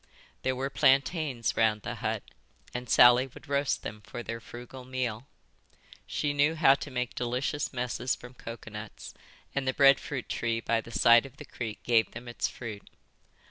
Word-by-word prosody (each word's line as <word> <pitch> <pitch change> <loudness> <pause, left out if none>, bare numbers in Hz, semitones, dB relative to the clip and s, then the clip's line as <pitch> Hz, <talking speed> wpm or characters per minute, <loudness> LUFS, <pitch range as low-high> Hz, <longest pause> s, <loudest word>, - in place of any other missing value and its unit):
There 130 0 0
were 135 +2 -3
plantains 135 -3 +2
round 110 -2 +2
the - - -4
hut - - -2 0.5
and 125 -1 -5
Sally 125 +2 +7
would 130 - -15
roast 140 0 0
them 105 +1 -6
for 120 +3 -7
their 115 0 -5
frugal 120 +3 -10
meal. 125 -1 -3 0.8
She 145 -1 -1
knew 145 +3 +3
how 155 -4 +6
to 140 - -5
make 125 -2 -3
delicious 125 +4 -2
messes 125 0 -1
from 125 +1 -12
coconuts, 110 -3 -9 0.4
and 140 -1 -2
the 130 - +1
bread 140 -1 +7
fruit 135 -4 -5
tree 115 -1 -1
by 115 0 0
the 115 - -13
side 115 +4 +5
of 130 - -19
the - - -9
creek 110 -4 -6
gave 115 -2 +2
them 120 +2 -9
its 120 - -1
fruit. 110 -4 -8
125 Hz, 175 wpm, -29 LUFS, 115-135 Hz, 0.8 s, Sally